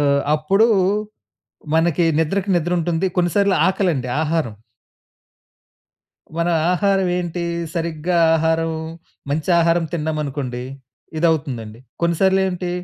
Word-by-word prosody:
ఆహ్, 140 -1 +3
అప్పుడు 195 +9 +3 1.1
మనకి 165 +1 +2
నిద్రకి 195 +5 0
నిద్ర 175 +1 -1
ఉంటుంది, 170 +2 0
కొన్ని 175 -1 +2
సార్లు 200 -1 +3
ఆకలండి 175 -10 0
ఆహారం. 155 -8 -1 1.8
మన 170 +1 +1 0.2
ఆహారం 195 0 +1
ఏంటి? 175 0 -3 0.3
సరిగ్గా 170 +1 -2 0.2
ఆహారం, 160 0 0 0.6
మంచి 155 +4 -1
ఆహారం 165 0 +2
తిన్నామనుకోండి. 145 -5 -3 0.6
ఇదవుతుందండి. 135 -9 -1 0.2
కొన్నిసార్లు 190 +3 +2
ఏంటి 180 -1 -4
165 Hz, 100 wpm, -20 LUFS, 150-180 Hz, 1.8 s, ఆహ్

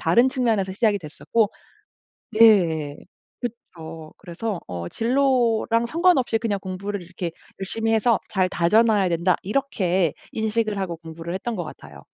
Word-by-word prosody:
다른 235 +11 +4
측면에서 225 -8 0
시작이 205 0 +2
됐었고 195 +7 -1 0.9
예. 165 -10 +5 0.4
그쵸. 165 -10 -8
그래서 195 +1 -4
어 85 -1 -5
진로랑 235 -2 +2
상관없이 310 -6 +2
그냥 215 -3 -1
'공부를 195 +2 -4
이렇게 175 0 -5 0.3
열심히 225 +4 -1
해서 225 +1 +3
잘 185 -2 +1
다져 185 +7 +4
놔야 210 -5 +2
된다.' 170 +1 +2
이렇게 190 - 0 0.2
인식을 220 -1 -1
하고 180 -3 -3
공부를 165 +1 -8
했던 225 +3 -3
것 175 - -3
같아요. 70 - -11
200 Hz, 310 characters per minute, -23 LUFS, 170-230 Hz, 0.9 s, 예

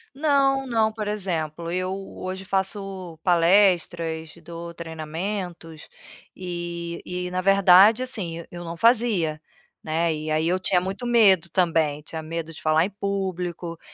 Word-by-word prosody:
Não, 275 -2 +2
não. 225 -3 +1
Por 215 -1 -5
exemplo, 170 -5 -3
eu 185 +1 -1 0.3
hoje 185 +1 -5
faço 190 -3 -3
palestras, 170 -3 +2
dou 170 +1 -8
treinamentos 165 +1 -6 0.5
e 175 -1 -5
e 180 0 -4
na 185 0 -1
verdade, 195 +4 +6
assim, 185 -10 -3
e 170 - -10
eu 175 0 -7
não 170 0 -6
fazia, 215 -8 +2 0.4
né, 160 +1 0
e 155 0 -4
aí 155 +1 +1
eu 185 +2 +1
tinha 180 -1 +2
muito 195 +6 -5
medo 200 -8 +5
também. 160 -5 +1
Tinha 160 +1 -7
medo 165 0 -5
de 160 - -12
falar 155 +2 +3
em - - -4
público, 185 -4 -4
180 Hz, 140 wpm, -24 LUFS, 165-195 Hz, 0.5 s, verdade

